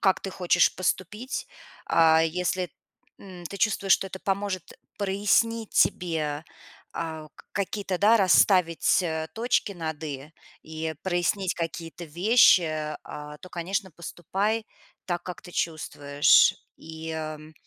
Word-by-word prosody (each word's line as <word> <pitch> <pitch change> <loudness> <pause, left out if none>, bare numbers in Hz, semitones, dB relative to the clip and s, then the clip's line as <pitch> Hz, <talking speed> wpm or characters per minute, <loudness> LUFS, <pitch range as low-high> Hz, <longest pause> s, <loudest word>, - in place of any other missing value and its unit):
как 190 -1 +3
ты 195 - -5
хочешь 175 -3 +2
поступить, 205 - -3 0.4
а, 160 -1 +5
если, 180 +2 -1 0.5
м, 185 -3 -11
ты 200 - -7
чувствуешь, 200 -2 +2
что - - +3
это 190 0 -8
поможет 195 -2 -3 0.2
прояснить 205 +3 +1
тебе, 155 -3 +1 0.5
а, 160 -2 -5
к - - -17
какие-то, 200 -2 -2
да, 220 +3 +5
расставить, 185 -3 +4
а, 160 -2 -2
точки 230 -3 0
над 160 -3 -5
"и" 140 -1 -6 0.3
и 160 0 -6
э, 160 - -4
прояснить 185 +1 0
какие-то 165 0 -5
вещи, 165 -4 +3
а, 150 0 -9
то, 185 - -12
конечно, 190 +3 -3
поступай 195 +7 -3 0.4
так, 175 -1 -2
как 180 - -7
ты 180 - -11
чувствуешь. 145 -4 +3 0.2
И, 160 0 -8
ам 155 0 -6
175 Hz, 130 wpm, -26 LUFS, 160-195 Hz, 0.5 s, а